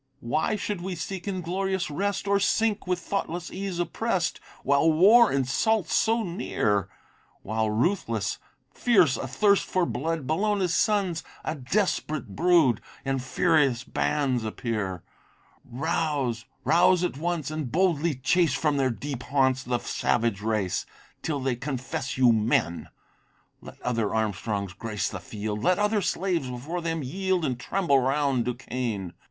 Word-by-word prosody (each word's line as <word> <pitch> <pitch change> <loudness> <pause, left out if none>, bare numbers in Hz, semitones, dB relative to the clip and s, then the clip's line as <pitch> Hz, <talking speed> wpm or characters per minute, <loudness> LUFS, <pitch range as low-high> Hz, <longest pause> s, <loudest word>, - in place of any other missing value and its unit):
Why 140 - 0
should 205 -2 -3
we 185 0 -4
seek 185 +3 -5
inglorious 190 -1 -2
rest, 200 +5 -2
Or 200 0 +3
sink, 215 0 +1
with 180 -1 +1
thoughtless 175 -1 -3
ease 190 -1 -4
oppress'd, 175 +1 -1 0.2
While 140 +4 +4
war 210 +8 +6
insults 155 - +1
so 225 +1 +2
near? 105 - -1 0.5
While 110 +1 -1
ruthless, 115 - 0 0.3
fierce, 185 - +4
athirst 135 - +2
for 185 -2 0
blood, 160 +1 -2
Bellona's 190 +3 +1
sons, 195 -6 +1 0.2
a - - -1
desperate 155 +2 -1
brood! 165 -9 +4 0.2
In 135 0 0
furious 135 -1 +2
bands 130 -3 0
appear! 105 -5 -3 0.6
Rouse, 135 -3 -1 0.2
rouse 180 +1 +4
at 175 -6 -1
once, 165 -3 -2
and 155 -5 -4
boldly 170 -3 +2
chase 145 +4 +2
From 145 +1 +1
their 135 -1 +2
deep 130 +2 -5
haunts, 130 -2 +1
the 125 -1 -1
savage 115 -3 0
race, 105 -4 -1 0.3
Till 150 -3 -2
they 130 -2 0
confess 130 0 -4
you 125 -2 +6
men. 105 -6 +1 0.7
Let - - -12
other 115 -4 0
Armstrongs 105 -2 -2
grace 105 +1 -3
the 100 - -6
field! 105 +2 -5
Let 180 +7 +3
other 210 0 +2
slaves 175 -7 -1
before 145 +8 -4
them 165 -2 -2
yield, 185 +4 -1
And 125 -3 -2
tremble 165 -1 +2
round 135 -2 +1
Duquesne. 120 -6 -3
150 Hz, 135 wpm, -26 LUFS, 120-180 Hz, 0.7 s, war